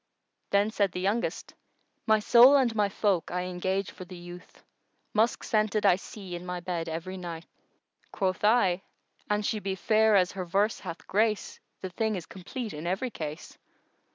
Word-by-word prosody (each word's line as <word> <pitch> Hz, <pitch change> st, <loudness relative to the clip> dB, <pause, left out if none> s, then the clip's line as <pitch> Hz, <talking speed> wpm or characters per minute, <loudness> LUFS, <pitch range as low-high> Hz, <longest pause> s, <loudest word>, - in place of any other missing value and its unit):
Then 200 Hz, +2 st, +2 dB
said 200 Hz, -4 st, +1 dB
the -, -, -3 dB
youngest:— 205 Hz, +6 st, -1 dB, 0.5 s
My 220 Hz, 0 st, +5 dB
soul 240 Hz, +5 st, +7 dB
and 255 Hz, -5 st, +3 dB
my 210 Hz, -2 st, +1 dB
folk 195 Hz, -4 st, 0 dB
I 180 Hz, 0 st, -2 dB
engage 185 Hz, +2 st, -2 dB
for -, -, -10 dB
the 180 Hz, 0 st, -10 dB
youth 175 Hz, +1 st, -12 dB, 0.3 s
* -, -, -46 dB
Musk 220 Hz, +2 st, +2 dB
scented 215 Hz, -1 st, +1 dB
I 180 Hz, -3 st, +6 dB
see 195 Hz, -1 st, -9 dB
in 175 Hz, 0 st, -5 dB
my 180 Hz, 0 st, -4 dB
bed 170 Hz, -2 st, -3 dB
every 170 Hz, +4 st, -5 dB
night! 170 Hz, -2 st, -7 dB, 0.7 s
Quoth 190 Hz, -1 st, -1 dB
I, 205 Hz, -5 st, +3 dB, 0.5 s
"An 210 Hz, 0 st, +1 dB
she 215 Hz, +1 st, -1 dB
be 195 Hz, -1 st, -3 dB
fair 215 Hz, +2 st, +3 dB
as 180 Hz, -2 st, +4 dB
her 190 Hz, -1 st, -4 dB
verse 200 Hz, +5 st, +1 dB
hath 170 Hz, -3 st, -8 dB
grace, 215 Hz, +1 st, 0 dB, 0.2 s
the 185 Hz, -, -5 dB
thing 220 Hz, +2 st, -1 dB
is 175 Hz, -4 st, -5 dB
complete 215 Hz, +5 st, -7 dB
in 150 Hz, +3 st, -6 dB
every 195 Hz, +8 st, -1 dB
case." 155 Hz, -4 st, -7 dB
195 Hz, 180 wpm, -28 LUFS, 180-215 Hz, 0.7 s, soul